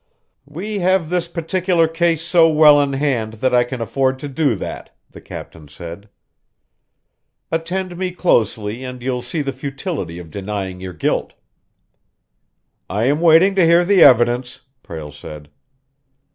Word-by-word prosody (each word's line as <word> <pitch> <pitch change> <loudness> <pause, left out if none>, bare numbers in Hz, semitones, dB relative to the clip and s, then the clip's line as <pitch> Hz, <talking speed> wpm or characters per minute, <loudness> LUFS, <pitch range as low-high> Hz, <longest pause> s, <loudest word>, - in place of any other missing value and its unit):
"We 195 +8 -5
have 180 -2 +1
this 175 -1 0
particular 170 0 0
case 165 0 0
so 170 -1 +4
well 150 -2 +6
in 140 -1 -1
hand 130 -6 -1
that 125 +4 -1
I 120 0 +5
can 120 0 -6
afford 130 +4 0
to 145 - -7
do 140 -3 0
that," 95 - -8
the - - -13
captain 80 -3 -10
said. 85 +7 -10 1.4
"Attend 180 +3 -3
me 185 0 -2
closely 115 - 0
and 125 -1 -8
you'll 125 -1 -2
see 145 +5 -3
the 135 -1 -3
futility 135 - -5
of 85 -3 -10
denying 95 -1 -5
your 95 -1 -7
guilt." 75 - -2 1.5
"I 105 +5 -1
am 145 +5 +1
waiting 170 +4 +5
to 190 -2 +3
hear 170 +1 +4
the 195 -1 +4
evidence," 120 -2 +4 0.2
Prale 80 - -8
said. 75 0 -11
135 Hz, 145 wpm, -19 LUFS, 110-170 Hz, 1.5 s, well